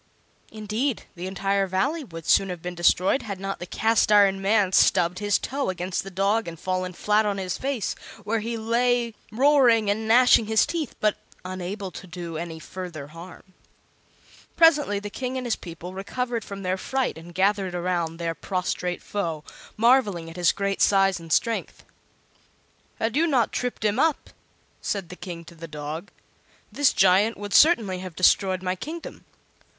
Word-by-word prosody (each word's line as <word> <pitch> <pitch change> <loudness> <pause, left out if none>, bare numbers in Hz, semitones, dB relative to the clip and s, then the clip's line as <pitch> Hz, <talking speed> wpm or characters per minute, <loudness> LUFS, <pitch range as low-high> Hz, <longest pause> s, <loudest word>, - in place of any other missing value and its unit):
Indeed, 220 +4 -2
the 180 +1 -6
entire 195 +1 0
Valley 200 - -1
would 165 - -10
soon 195 - +4
have 180 -2 -6
been 180 0 -4
destroyed 180 +7 +2
had 200 -4 -6
not 195 0 -4
the 175 - -7
Cast 220 +2 +2
iron 200 -2 +5
Man 200 -1 +2
stubbed 175 -1 +3
his 205 -1 +2
toe 275 -2 -3
against 180 0 -2
the 195 - -8
dog 200 +3 0
and 165 -1 -7
fallen 185 0 -2
flat 210 +4 +2
on 205 -2 -1
his 185 -2 -3
face, 265 -5 -2 0.3
where 220 +2 0
he 230 +2 -3
lay 235 +1 +1 0.2
roaring 240 -4 +4
and 220 +2 -2
gnashing 235 -1 +5
his 220 0 +4
teeth, 325 -4 -4
but 215 -1 +1 0.3
unable 185 +2 -5
to 185 - -10
do 170 -2 -7
any 165 0 -5
further 160 -3 -8
harm. 175 +3 -12 1.0
Presently 300 -10 +4
the 205 0 -7
King 255 +2 -4
and 255 - -4
his 235 - 0
people 170 +1 -9
recovered 235 +4 -3
from 200 0 -8
their 185 +1 -1
fright 265 +6 -1
and 165 +1 -12
gathered 195 -1 +1
around 175 -2 -1
their 165 -1 -2
prostrate 180 0 -3
foe, 165 -7 -3 0.3
marveling 210 -8 +3
at - - -13
his 175 -2 +3
great 200 0 -2
size 195 -2 +4
and 165 -1 -11
strength. 230 +7 0 1.1
"Had 225 +2 -1
you 325 +3 +3
not 255 -8 +2
tripped 245 -3 -3
him 210 +3 +1
up," 320 0 +1 0.5
said 195 -5 -3
the 180 - -8
King 175 -3 -8
to 170 - -13
the 165 0 -9
dog, 155 +4 -6 0.6
"this 285 -2 +3
giant 195 +4 +3
would 205 -1 -6
certainly 225 - +5
have 185 -3 -8
destroyed 185 +1 +3
my 185 0 -1
kingdom. 320 - -8
195 Hz, 170 wpm, -25 LUFS, 180-225 Hz, 1.1 s, iron